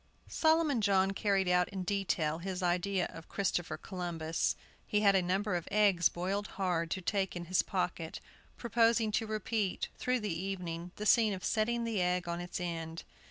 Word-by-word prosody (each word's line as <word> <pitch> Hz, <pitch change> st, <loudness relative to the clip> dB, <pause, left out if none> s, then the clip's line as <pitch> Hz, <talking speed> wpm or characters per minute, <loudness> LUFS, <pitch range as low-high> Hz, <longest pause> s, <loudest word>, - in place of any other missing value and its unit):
Solomon 315 Hz, -6 st, +3 dB
John 195 Hz, -2 st, +3 dB
carried 195 Hz, -1 st, +1 dB
out 180 Hz, 0 st, +3 dB
in 190 Hz, -2 st, -4 dB
detail 175 Hz, -5 st, 0 dB
his 185 Hz, +1 st, -4 dB
idea 180 Hz, +1 st, +1 dB
of 165 Hz, -, -11 dB
Christopher 180 Hz, -3 st, -1 dB
Columbus. 170 Hz, -3 st, -2 dB, 0.3 s
He 210 Hz, -, +1 dB
had 200 Hz, -2 st, +5 dB
a 190 Hz, -, +4 dB
number 190 Hz, +2 st, 0 dB
of 175 Hz, -, -3 dB
eggs 200 Hz, -4 st, +4 dB
boiled 195 Hz, +4 st, -2 dB
hard 175 Hz, -4 st, 0 dB
to 190 Hz, -, -2 dB
take 190 Hz, 0 st, -1 dB
in 175 Hz, 0 st, -5 dB
his 185 Hz, +1 st, +3 dB
pocket, -, -, -3 dB, 0.4 s
proposing 230 Hz, -2 st, +2 dB
to 220 Hz, +1 st, 0 dB
repeat, 215 Hz, -2 st, -1 dB
through 250 Hz, -1 st, 0 dB
the 210 Hz, -4 st, -2 dB
evening, 175 Hz, -2 st, -4 dB
the 210 Hz, -, -5 dB
scene 220 Hz, -1 st, +5 dB
of 185 Hz, -, -5 dB
setting 235 Hz, +2 st, +1 dB
the 225 Hz, -4 st, -1 dB
egg 180 Hz, 0 st, 0 dB
on 170 Hz, 0 st, -2 dB
its 175 Hz, +1 st, -5 dB
end. 165 Hz, -2 st, -4 dB
190 Hz, 175 wpm, -32 LUFS, 175-210 Hz, 0.4 s, had